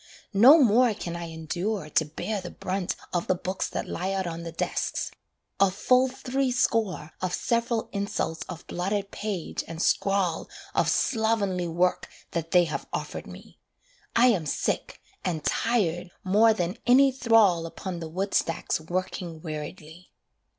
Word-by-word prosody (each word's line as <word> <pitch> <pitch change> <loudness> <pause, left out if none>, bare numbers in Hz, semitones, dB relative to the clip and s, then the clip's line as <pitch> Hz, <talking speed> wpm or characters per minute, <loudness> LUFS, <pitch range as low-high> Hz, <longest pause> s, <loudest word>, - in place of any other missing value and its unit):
No 245 +10 +9
more 240 -4 +5
can 170 -4 -5
I 170 0 -5
endure 170 +4 -3
to 160 +1 +2
bear 195 +7 -4
the 180 - -7
brunt 185 0 -3 0.2
Of 175 -1 -1
the 185 - +3
books 185 +1 -3
that - - -4
lie 190 +2 -2
out 190 -1 -1
on 170 -1 -4
the 170 0 -6
desks: 165 - -2 0.5
a 195 0 +6
full 250 +7 +3
three 265 +1 -1
score 220 -10 0
Of 185 -1 0
several 235 -1 0
insults 200 -5 -2
of 175 -2 -8
blotted 195 +2 -2
page 205 -5 -3
and 165 -1 -7
scrawl 195 -1 +1 0.2
Of - - +2
slovenly 215 -6 +1
work 175 +2 0 0.2
that 165 -2 -3
they 180 +1 +5
have 160 -3 -4
offered - - -4
me. - - -13 0.6
I 245 +2 +6
am 180 -10 +1
sick, - - -2 0.2
and 165 -5 -2
tired 185 -7 +1
more 210 +4 +5
than 185 +1 -2
any 265 +2 +6
thrall 225 -10 +4
Upon 175 +1 -6
the 165 -1 -6
woodstacks 185 -2 0
working 175 0 -4
weariedly. 160 +2 -7
185 Hz, 150 wpm, -27 LUFS, 170-220 Hz, 0.6 s, No